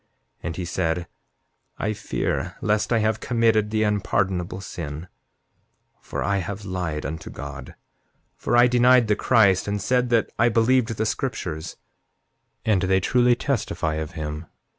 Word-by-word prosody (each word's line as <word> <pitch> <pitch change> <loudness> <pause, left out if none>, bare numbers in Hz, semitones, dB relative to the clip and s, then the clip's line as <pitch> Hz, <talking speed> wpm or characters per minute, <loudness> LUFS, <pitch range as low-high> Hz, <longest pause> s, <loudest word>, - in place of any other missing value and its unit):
7:19 - - -45 0.4
And 85 - -4
he 90 0 -4
said: 85 0 -1 0.7
I 105 - -1
fear - - -3
lest 105 +1 0
I 115 - +4
have 110 0 +1
committed 115 -3 +2
the 110 0 +1
unpardonable 95 -3 0
sin, 85 -3 -6 0.9
for - - -4
I 100 0 +1
have 100 +3 -5
lied 90 -5 -3
unto 80 +2 -5
God; 70 -2 -8 0.6
for 120 - 0
I 120 - +7
denied 125 -1 +4
the 105 - +4
Christ, 100 -6 +3
and 100 0 -1
said 125 +4 +1
that 115 -3 +2
I 120 +1 +5
believed 115 0 +2
the 110 - 0
scriptures; 85 - -3 0.9
and 105 -4 +3
they 95 0 +2
truly 125 +5 +3
testify 95 - -1
of 80 -1 -5
him. 75 +1 -5
100 Hz, 150 wpm, -24 LUFS, 85-115 Hz, 0.9 s, I